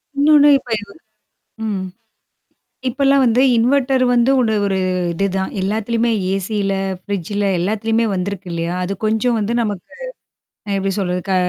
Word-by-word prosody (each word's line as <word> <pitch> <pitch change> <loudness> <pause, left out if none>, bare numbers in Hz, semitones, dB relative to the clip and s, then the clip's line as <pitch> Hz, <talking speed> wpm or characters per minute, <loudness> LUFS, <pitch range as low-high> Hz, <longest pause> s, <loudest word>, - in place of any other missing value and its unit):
இன்னொன்னு 295 +1 +5
இப்ப 255 - -17
இவ 205 -1 -12 0.8
ம். 200 -3 -2 1.1
இப்பல்லாம் 275 +2 +2
வந்து, 240 0 +3 0.2
இன்வெர்ட்டர் 260 +2 +2
வந்து 240 +2 +3
உட 230 -3 +1 0.2
ஒரு 195 -1 0 0.3
இதுதான். 190 +2 -1
எல்லாத்துலயுமே 225 +4 0 0.2
ஏசில, 195 +1 -1 0.3
ஃப்ரிட்ஜல, 200 +1 -3
எல்லாத்துலயுமே 220 +5 0
வந்திருக்கு 190 0 -4
இல்லையா? 170 +1 -2
அது 185 - -3
கொஞ்சம் 220 +3 +1
வந்து 215 +2 -1
நமக்கு 205 -5 -4 0.8
அ - - -1
எப்டி 195 0 -1
சொல்றது. 180 -2 -1
க - - +2
210 Hz, 130 wpm, -18 LUFS, 195-235 Hz, 1.1 s, இன்னொன்னு